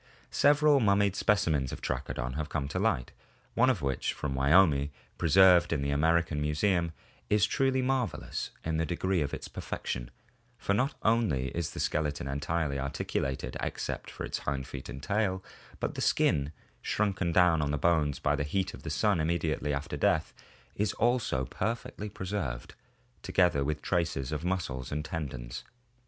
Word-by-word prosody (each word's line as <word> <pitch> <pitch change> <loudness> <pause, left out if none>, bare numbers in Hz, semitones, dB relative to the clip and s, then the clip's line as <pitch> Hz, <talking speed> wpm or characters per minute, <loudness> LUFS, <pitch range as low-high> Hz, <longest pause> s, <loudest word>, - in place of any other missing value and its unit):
Several 145 0 +5
mummied 100 -3 +3
specimens 80 - +2
of - - -6
Trachodon 65 +1 -3
have 75 +2 -3
come 70 -3 -2
to - - -2
light, 60 - 0 0.4
one 125 +2 +4
of 100 - 0
which 70 -2 -1
from 70 - -3
Wyoming, 70 +1 +4 0.3
preserved 90 +1 +6
in 75 -4 0
the 70 - 0
American 80 +1 +2
Museum, 85 +3 +1 0.4
is 105 -1 +4
truly 130 +3 +1
marvel 130 -3 0
ous - - -4 0.2
in 80 0 0
the 80 - +1
degree 90 0 0
of 70 - -1
its - - -5
perfection, - - -5 0.5
for 100 - 0
not 130 +8 +1
only 105 - +2
is 85 -2 -3
the - - -7
skeleton 75 -3 -1
entirely 70 +1 -1
articulated 70 -1 -2
except - - -4
for - - -7
its - - -3
hind 70 -1 -2
feet 70 -2 -8
and 65 +2 -7
tail, 100 -2 0 0.4
but - - -2
the - - -5
skin, 70 +1 +2 0.3
shrunken 100 -2 0
down 85 -2 +4
on 75 - 0
the 75 - 0
bones 75 -2 +2
by - - +1
the - - -2
heat 95 +6 -1
of - - -10
the 80 - -5
sun 90 +5 +2
immediately 80 -2 0
after 70 +1 -3
death, - - +1 0.4
is 105 0 0
also 115 - +1
perfectly 105 - -3
preserved, 90 -12 -4 0.5
together 90 -6 +2
with 75 +1 -2
traces 80 -7 -1
of 75 0 -3
muscles 80 -8 -2
and 75 +1 -2
tendons. 70 -7 -5
80 Hz, 165 wpm, -30 LUFS, 70-100 Hz, 0.5 s, preserved